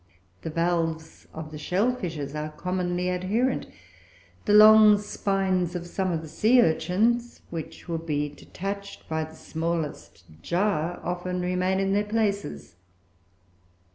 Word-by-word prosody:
The -, -, -4 dB
valves 165 Hz, -1 st, -2 dB
of 155 Hz, -1 st, -8 dB
the 150 Hz, -, -7 dB
shell 200 Hz, +11 st, +1 dB
fishes 160 Hz, -, -5 dB
are 150 Hz, 0 st, -3 dB
commonly 180 Hz, +1 st, -2 dB
adherent; 205 Hz, +8 st, 0 dB, 0.8 s
the 205 Hz, -, +2 dB
long 215 Hz, 0 st, +9 dB
spines 195 Hz, -3 st, -1 dB
of 175 Hz, -1 st, -4 dB
some 185 Hz, +1 st, -2 dB
of 165 Hz, -1 st, -2 dB
the -, -, -8 dB
sea 225 Hz, +10 st, +3 dB
urchins, 235 Hz, +6 st, +1 dB
which 165 Hz, +1 st, -7 dB
would 165 Hz, -1 st, -4 dB
be 150 Hz, -1 st, 0 dB
detached 200 Hz, +6 st, -7 dB
by 160 Hz, 0 st, -1 dB
the 160 Hz, 0 st, -13 dB
smallest 165 Hz, -1 st, -4 dB, 0.2 s
jar, 175 Hz, -, 0 dB
often 180 Hz, +1 st, -3 dB
remain 180 Hz, +1 st, 0 dB
in 195 Hz, 0 st, +1 dB
their 205 Hz, +1 st, +2 dB
places. 200 Hz, -, -2 dB
180 Hz, 135 wpm, -26 LUFS, 160-200 Hz, 0.8 s, long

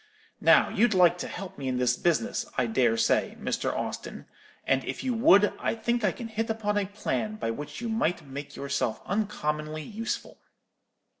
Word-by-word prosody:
Now -, -, +5 dB
you'd 225 Hz, -3 st, +2 dB
like 180 Hz, -1 st, +5 dB
to -, -, -3 dB
help 180 Hz, -4 st, -7 dB
me 135 Hz, -, -4 dB
in 130 Hz, -1 st, 0 dB
this 125 Hz, 0 st, +2 dB
business, 170 Hz, +3 st, 0 dB
I 125 Hz, -, +3 dB
dare 115 Hz, 0 st, +2 dB
say, -, -, +1 dB
Mr. -, -, -1 dB
Austin; -, -, -5 dB, 0.4 s
and 135 Hz, -1 st, +2 dB
if -, -, -5 dB
you 255 Hz, -2 st, 0 dB
would, 225 Hz, -4 st, +5 dB
I -, -, 0 dB
think 235 Hz, +1 st, -1 dB
I 200 Hz, -, +3 dB
can 235 Hz, -, -7 dB
hit 225 Hz, 0 st, -3 dB
upon 215 Hz, -2 st, -1 dB
a 200 Hz, -, -2 dB
plan 215 Hz, +1 st, -2 dB
by 165 Hz, -, -2 dB
which 145 Hz, -, -7 dB
you 235 Hz, -, -3 dB
might 180 Hz, -8 st, 0 dB
make 140 Hz, +1 st, -8 dB
yourself 140 Hz, -5 st, -1 dB
uncommonly 155 Hz, -7 st, -2 dB
useful.' 225 Hz, +6 st, -5 dB
180 Hz, 180 wpm, -28 LUFS, 140-220 Hz, 0.4 s, Now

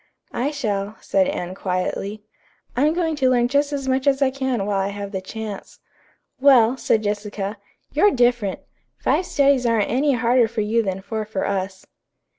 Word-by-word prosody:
"I 255 Hz, +4 st, 0 dB
shall," 210 Hz, -8 st, -3 dB
said 285 Hz, -1 st, +1 dB
Anne 185 Hz, -11 st, -3 dB
quietly. 195 Hz, +3 st, -3 dB, 0.5 s
"I'm 290 Hz, +5 st, +3 dB
going 330 Hz, -3 st, 0 dB
to 260 Hz, -2 st, +3 dB
learn 245 Hz, -1 st, +3 dB
just 285 Hz, +3 st, +1 dB
as 275 Hz, -2 st, -3 dB
much 260 Hz, +1 st, 0 dB
as 270 Hz, -1 st, +3 dB
I 275 Hz, -2 st, +3 dB
can 260 Hz, -6 st, -1 dB
while 200 Hz, -1 st, 0 dB
I 195 Hz, -, 0 dB
have 200 Hz, 0 st, -6 dB
the 190 Hz, -2 st, -3 dB
chance." 210 Hz, +1 st, -7 dB, 0.6 s
"Well," 260 Hz, -3 st, +6 dB
said 220 Hz, -4 st, +1 dB
Jessica, 205 Hz, 0 st, -3 dB, 0.3 s
"you're 320 Hz, +9 st, +5 dB
different. 240 Hz, -, +1 dB, 0.4 s
Five 365 Hz, -, 0 dB
studies 275 Hz, -3 st, +3 dB
aren't 225 Hz, -3 st, +1 dB
any 275 Hz, +4 st, +2 dB
harder 240 Hz, 0 st, +3 dB
for 225 Hz, 0 st, -3 dB
you 220 Hz, +2 st, +1 dB
than 190 Hz, -2 st, -3 dB
four 220 Hz, +2 st, -3 dB
for 210 Hz, -2 st, -3 dB
us." 190 Hz, -1 st, -3 dB
230 Hz, 175 wpm, -22 LUFS, 205-270 Hz, 0.6 s, Well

